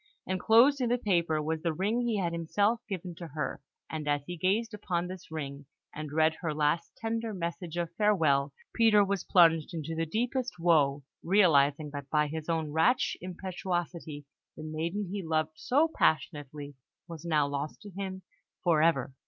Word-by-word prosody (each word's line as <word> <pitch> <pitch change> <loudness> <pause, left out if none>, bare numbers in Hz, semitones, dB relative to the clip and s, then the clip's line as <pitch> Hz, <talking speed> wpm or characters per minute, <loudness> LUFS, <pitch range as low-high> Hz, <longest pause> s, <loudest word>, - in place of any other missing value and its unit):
Enclosed 230 +9 +4
in 245 - +1
the 245 - +2
paper 170 -8 +1
was 160 +1 -2
the 165 -1 0
ring 205 +9 0
he 235 -3 0
had 175 -3 -1
himself 205 +8 +1
given 185 -2 -4
to 170 0 -8
her; 150 0 -4 0.3
and 155 -2 -5
as 145 -1 0
he 175 - -5
gazed 210 +6 0
upon 180 -4 -2
this 185 0 -8
ring, 140 -3 -6 0.3
and 150 -1 -6
read 155 +1 +3
her 160 -4 -2
last 155 +3 0
tender 225 -1 -3
message 170 -1 -4
of 170 -1 -2
farewell, 155 -10 +3 0.2
Peter 215 -3 +5
was 200 -1 -1
plunged 165 -2 +4
into 160 0 -4
the 165 0 -2
deepest 245 - -2
woe, 150 -5 +3 0.2
realising 155 -6 +3
that 140 -1 -7
by 150 0 +2
his 155 +2 -5
own 160 -2 -1
rash 160 - +2
impetuosity 175 -4 -4 0.3
the 155 - -7
maiden 165 +6 -3
he 200 0 -3
loved 160 -2 0
so 275 - +2
passionately 145 -2 -1 0.3
was 165 -2 -9
now 155 -4 +2
lost 145 +1 -4
to 205 - -10
him 190 0 -6 0.4
for 165 -4 +3
ever. 155 -5 +2
170 Hz, 170 wpm, -30 LUFS, 155-195 Hz, 0.4 s, Peter